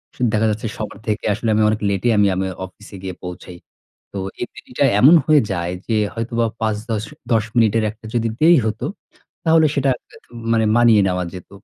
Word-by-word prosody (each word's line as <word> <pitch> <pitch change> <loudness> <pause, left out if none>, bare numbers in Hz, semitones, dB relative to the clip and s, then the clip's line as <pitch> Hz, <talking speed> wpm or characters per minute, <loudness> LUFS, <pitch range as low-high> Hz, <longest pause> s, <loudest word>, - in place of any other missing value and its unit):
সু - - -13
দেখা 110 +1 +2
যাচ্ছে 110 +2 -3
সবার 110 - -6
থেকে 105 +1 -2
আসলে 110 +2 -2
আমি 110 - +3
অনেক 110 - 0
লেটে 100 +5 0
আমি, 100 -1 +4
আমি 95 +1 -1 0.2
অফিসে 100 +2 -14
গিয়ে 95 -2 -5
পৌঁছাই। 90 0 -8 0.6
তো - - -5 0.2
এই - - 0
দেরিটায় 130 0 0
এমন 155 +7 +8
হয়ে 155 -2 +5
যায় 85 -1 -2
যে 110 -2 +1 0.2
হয়তোবা 115 0 -1 0.2
৫-১০, 110 0 -2 0.3
১০ 110 -2 +3
মিনিটের 115 -1 +3
একটা 110 0 -18
যদি 115 -1 +1
দেরি 170 +1 +7
হত, 110 0 -3 0.6
তাহলে 160 -1 +5
সেটা 140 -1 +2 0.2
হয়তো - - -19 0.2
মানে 110 -1 +2
মানিয়ে 115 -3 +5
নেওয়া 90 -1 -1
যেত। 90 -2 -10
110 Hz, 185 wpm, -20 LUFS, 100-120 Hz, 0.6 s, এমন